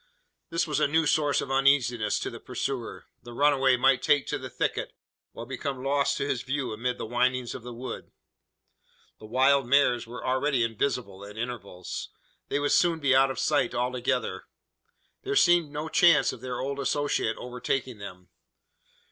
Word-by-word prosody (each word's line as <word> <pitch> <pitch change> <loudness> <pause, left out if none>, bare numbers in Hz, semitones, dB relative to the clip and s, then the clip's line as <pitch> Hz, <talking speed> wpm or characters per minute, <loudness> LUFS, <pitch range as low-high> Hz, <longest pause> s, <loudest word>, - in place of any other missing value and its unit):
This 170 0 0
was 150 -2 -1
a - - +3
new 160 +2 +2
source 145 -1 +2
of 135 - -5
uneasiness 130 -5 +2
to - - -3
the - - -9
pursuer. - - -4 0.2
The 120 0 -11
runaway 135 -2 +3
might 135 +1 +3
take 145 -2 +3
to - - -2
the - - -7
thicket, - - -2 0.4
or 115 - -7
become 130 +1 -5
lost 140 +1 +1
to 140 - -2
his 125 -4 -1
view 130 -2 -3
amid 125 +3 -2
the - - -5
windings 125 +1 0
of - - -7
the 120 +1 -8
wood. 125 +2 -7 1.1
The 110 - -11
wild 130 +3 +3
mares 125 -3 +3
were 120 0 -8
already 130 0 +1
invisible 115 -4 -2
at 105 +1 -11
intervals. 110 -6 -6 0.4
They - - 0
would 145 0 0
soon 170 -2 +3
be 140 -4 +2
out 135 +1 +5
of 135 - -5
sight 145 -5 +1
altogether. 125 +1 -1 0.8
There 410 +1 -3
seemed 175 - +4
no 150 +2 -5
chance 165 -1 +4
of 115 - -11
their 125 -1 -4
old 140 +1 -3
associate 140 -4 0
overtaking 125 -1 -3
them. 90 -3 -10
130 Hz, 175 wpm, -27 LUFS, 120-145 Hz, 1.1 s, out